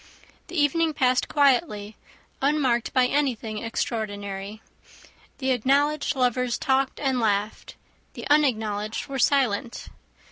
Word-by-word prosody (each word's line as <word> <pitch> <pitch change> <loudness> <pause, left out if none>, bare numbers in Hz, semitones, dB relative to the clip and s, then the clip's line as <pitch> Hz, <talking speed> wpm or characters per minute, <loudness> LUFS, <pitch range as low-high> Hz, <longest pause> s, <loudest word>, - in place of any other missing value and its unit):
The 355 -2 -3
evening 310 +2 +2
passed 255 -1 +2
quietly, 250 -7 +1 0.5
unmarked 270 -5 +1
by 255 -1 +3
anything 245 -6 -1
extraordinary. 205 -3 -4 0.8
The 265 -1 -1
acknowledged 285 +4 +1
lovers 250 -1 0
talked 265 0 0
and 265 -3 0
laughed; 210 -1 -1 0.4
the - - -6
unacknowledged 220 -8 +1
were 270 -1 -5
silent. 245 -3 0
250 Hz, 105 wpm, -25 LUFS, 220-280 Hz, 0.8 s, by